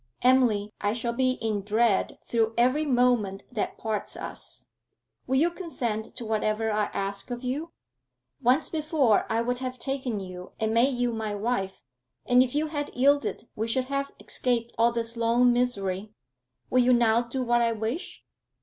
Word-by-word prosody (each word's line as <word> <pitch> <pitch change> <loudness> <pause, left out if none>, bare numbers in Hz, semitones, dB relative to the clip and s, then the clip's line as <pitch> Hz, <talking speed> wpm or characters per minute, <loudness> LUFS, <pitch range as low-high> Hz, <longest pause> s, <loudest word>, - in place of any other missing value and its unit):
'Emily, 235 -5 +3
I 205 +1 +1
shall 235 0 -2
be 255 +1 +2
in 220 -4 -2
dread 215 0 +1
through 225 -1 0
every 255 +6 +3
moment 245 -7 +2
that 225 -4 -3
parts 220 -2 -3
us. - - -7 0.6
Will 260 - +1
you 325 +6 +3
consent 240 - -4
to 235 - -5
whatever 220 0 0
I 210 0 +1
ask 200 +2 -4
of 245 +1 -5
you? 290 +7 -3 0.7
Once 255 +5 +3
before 305 -8 +1
I 225 +1 +1
would 245 +1 -1
have 255 -1 -4
taken 260 -5 -2
you 185 -1 -9
and 220 0 0
made 245 +3 +3
you 245 -1 0
my 220 -2 -3
wife, 205 -3 -2 0.4
and 250 0 +5
if 255 +1 0
you 300 +1 +2
had 290 -2 -3
yielded 280 -2 +2
we 220 +1 -2
should 255 +3 0
have 275 0 0
escaped 235 -2 0
all 230 +1 +3
this 230 0 -2
long 235 +1 +3
misery. 210 -4 -1 0.6
Will 255 - +4
you 250 +1 +4
now 235 -1 +4
do 245 +2 -3
what 240 0 +2
I 230 -1 +3
wish?' 225 - -4
235 Hz, 170 wpm, -27 LUFS, 220-255 Hz, 0.7 s, and